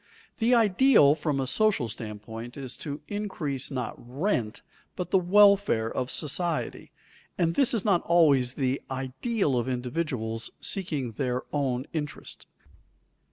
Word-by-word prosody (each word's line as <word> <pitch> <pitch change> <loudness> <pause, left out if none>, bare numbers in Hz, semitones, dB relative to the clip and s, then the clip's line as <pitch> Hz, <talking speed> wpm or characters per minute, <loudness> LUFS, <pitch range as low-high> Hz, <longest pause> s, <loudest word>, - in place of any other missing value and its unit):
The 240 +2 +4
ideal 220 - +5
from 150 -2 -1
a 135 - 0
social 205 - +1
standpoint 110 +2 -7
is 130 -3 -6
to 145 -1 -6
increase 165 -10 -3
not 130 -4 -3
rent 125 - -2 0.3
but 180 -1 -5
the 190 - +5
welfare 200 - +4
of 125 -1 -2
society, 165 +2 -2 0.5
and 165 -1 +1
this 265 +6 +3
is 225 -6 -1
not 195 -5 +3
always 145 -8 +4
the 135 -1 -1
ideal 135 - -1
of 120 - -2
individuals 125 -3 -3
seeking 150 - -2
their 125 +2 -2
own 135 -3 0
interest. 150 -3 -5
140 Hz, 130 wpm, -27 LUFS, 125-185 Hz, 0.5 s, ideal